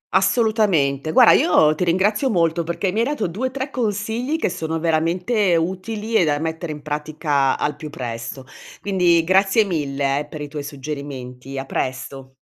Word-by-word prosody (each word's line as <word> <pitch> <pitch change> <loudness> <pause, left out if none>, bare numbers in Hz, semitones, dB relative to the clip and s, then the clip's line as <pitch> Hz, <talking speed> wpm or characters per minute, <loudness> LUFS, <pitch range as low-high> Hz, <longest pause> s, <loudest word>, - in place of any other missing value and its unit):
Assolutamente. 185 - +2
Guarda, - - +7
io 155 -3 +4
ti 155 - -2
ringrazio 205 +9 +2
molto 170 -5 +1
perché 170 +3 -2
mi 210 - -1
hai 230 - +3
dato 285 -5 -1
2-3 260 - -3
consigli 230 +5 -1
che - - 0
sono 160 -1 -3
veramente 175 +5 +1
utili 190 +6 -3
e 200 - +5
da 150 -2 +1
mettere 160 +1 -4
in 150 -1 -8
pratica 150 -2 0
al 150 - -1
più 150 +1 -8
presto. 120 0 -6 0.3
Quindi 180 -4 +2
grazie 195 +5 +4
mille, 140 -6 -1
eh, 150 - -4
per 155 -3 -8
i 145 - -4
tuoi 145 0 -6
suggerimenti. 135 -2 -7
A 135 - -4
presto! 130 0 -5
165 Hz, 165 wpm, -21 LUFS, 145-200 Hz, 0.3 s, Guarda